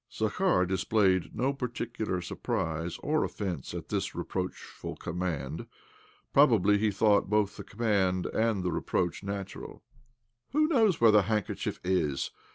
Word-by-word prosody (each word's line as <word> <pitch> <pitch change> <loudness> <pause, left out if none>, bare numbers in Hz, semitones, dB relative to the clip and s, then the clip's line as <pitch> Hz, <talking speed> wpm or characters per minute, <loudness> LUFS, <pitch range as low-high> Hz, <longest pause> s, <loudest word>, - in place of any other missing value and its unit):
Zakhar 110 - +1
displayed 95 0 +1
no 135 +3 +1
particular 115 -7 -3
surprise 80 0 -3
or 155 +1 +2
offence 90 -10 -4
at - - -6
this - - -2
reproachful 90 -1 -5
command. 85 -6 -4 0.7
Prob 140 -1 +7
ably 105 0 +3
he 110 0 +2
thought 100 0 +3
both 105 -1 +1
the - - -7
command 100 -5 0
and 110 -4 0
the 90 - 0
reproach 90 -2 -1
natural, 100 -1 -6 0.3
" 120 +1 -49
Who 305 +1 +4
knows 225 - +3
where 115 -2 +7
the 105 -1 +6
handkerchief 105 -3 -2
is 80 -7 0
105 Hz, 140 wpm, -29 LUFS, 90-115 Hz, 0.7 s, Prob